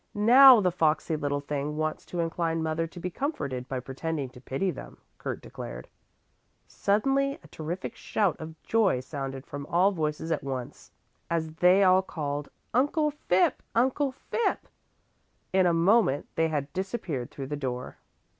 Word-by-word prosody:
"Now 245 +3 +8
the 180 -2 +2
foxy 160 -1 +1
little 145 -1 -1
thing 145 +1 -3
wants 155 0 -2
to 175 - -2
incline 165 -1 -1
mother 160 +1 -1
to 170 +2 -11
be 180 +1 -4
comforted 140 - -3
by 130 - -2
pretending 135 +2 -4
to 125 0 -15
pity 135 +9 -1
them," - - -10 0.2
Kurt - - -5
declared. - - -8 0.8
Suddenly 275 +7 +1
a - - -14
terrific 175 +8 -5
shout 205 -7 0
of 160 0 -9
joy 210 - +2
sounded 135 0 -6
from 145 -2 -7
all 185 +4 +3
voices 160 -2 -2
at 155 - -1
once 135 0 -6 0.4
as 160 -2 -1
they 180 +4 +5
all 185 0 +6
called: 145 -5 -4 0.2
"Uncle 295 +5 +2
Phipp! 185 -11 +1
Uncle 265 +4 +2
Phipp!" 455 - -2 0.9
In 190 -1 +4
a - - +4
moment 170 - +3
they 165 0 +2
had 145 -3 -3
disappeared 185 - -3
through 135 - -7
the 145 +2 -4
door. 125 -3 -4
165 Hz, 155 wpm, -28 LUFS, 145-195 Hz, 0.9 s, Now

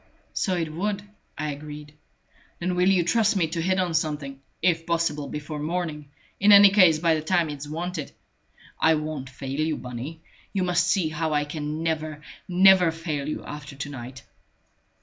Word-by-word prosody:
"So 185 - 0
it 165 -3 -2
would," 200 +4 -2 0.3
I 155 -1 -2
agreed. 150 +1 -9 0.6
"Then 180 +1 -2
will 180 +1 +3
you 185 -3 +4
trust 215 +4 +2
me 185 -4 +2
to 165 +1 -2
hit 185 +2 +1
on 180 -2 0
something 150 -4 -2 0.2
if 165 -2 +1
possible 165 -4 0
before 150 +1 -6
morning 155 -2 -3 0.3
in 205 +1 +5
any 200 -1 +9
case 185 -6 +6
by 165 +1 +2
the 155 - 0
time 165 -1 +1
it's 145 0 -7
wanted? 165 0 -4 0.7
I 160 0 +4
won't 150 -3 -4
fail 135 +1 -6
you, 155 0 0
Bunny. 125 +6 -7 0.3
You 195 -2 0
must 180 -1 +2
see 175 -3 +2
how 155 0 -2
I 145 0 +1
can 150 +1 -4
never, 155 -2 -2 0.2
never 185 -1 +6
fail 155 -3 -4
you - - -5
after 150 -1 -8
to 140 +1 -5
night!" 130 -1 -8
160 Hz, 175 wpm, -25 LUFS, 150-180 Hz, 0.7 s, any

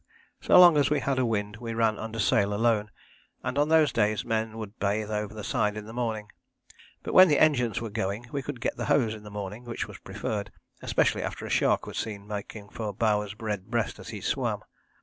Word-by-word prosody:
So - - +6
long 175 -4 +8
as 140 -2 +3
we 150 - +2
had 135 -2 0
a 130 - +2
wind 105 -1 -2
we 115 -1 -5
ran 115 -1 +1
under 110 0 -5
sail 100 0 +2
alone, 110 -1 +2 0.5
and - - -2
on 145 +1 +2
those 160 -2 +5
days 110 -2 +1
men 110 -1 -1
would 110 -1 -8
bathe 105 +1 -1
over 105 -1 -2
the 105 - -6
side 105 +1 0
in 105 - -6
the 110 - -9
morning, 110 -3 -3 0.7
but - - -4
when 185 0 +9
the 150 -3 +3
engines 125 -7 +3
were 115 -2 -5
going 105 +2 -2
we 140 - -2
could 135 -1 -6
get - - -2
the - - -3
hose 115 -6 +2
in 110 - -9
the 105 - -10
morning, 105 +2 -6
which 120 -1 -4
was - - -11
preferred, 100 -2 -4 0.3
especially - - +1
after - - -5
a - - -6
shark - - +2
was - - -5
seen 100 -2 -5
making 105 0 -7
for 110 -2 -4
Bowers' 105 -2 0
red 105 -4 -3
breast 115 -2 -1
as - - -9
he - - -6
swam. - - -1
110 Hz, 225 wpm, -27 LUFS, 105-120 Hz, 0.7 s, when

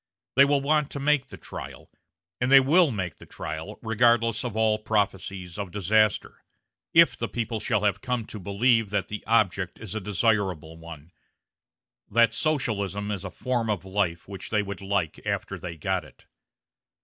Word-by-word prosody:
They 140 +2 +7
will 140 0 +2
want 150 +1 +1
to 140 - -4
make 145 0 +2
the - - -11
trial; - - -9 0.5
and 125 +2 0
they 135 - +10
will 155 +5 +4
make 95 - -4
the - - -13
trial, - - -6
regardless 115 -1 +2
of 120 -3 -4
all 110 -1 +2
prophecies 95 -4 -2
of 100 -2 -4
disaster, 105 +3 +1 0.5
if - - +6
the - - -3
people 115 -1 -3
shall 105 -1 0
have 100 -1 +1
come 125 -3 -2
to 105 - -8
believe 110 +3 +2
that 100 -2 -1
the 105 - -5
object 95 -5 +1
is 110 -6 -7
a 110 - -3
desirable 95 -5 0
one 80 -1 -11 1.0
that 115 +1 +4
Socialism 105 - -1
is 100 -3 -4
a 95 - -5
form 120 +1 -2
of 100 -3 -2
life 95 -3 -1
which 95 0 -8
they 105 -1 +1
would 100 0 -7
like 95 -5 -2
after - - -3
they 85 -2 -7
got 75 - -1
it. - - -18
105 Hz, 175 wpm, -26 LUFS, 95-115 Hz, 1.0 s, they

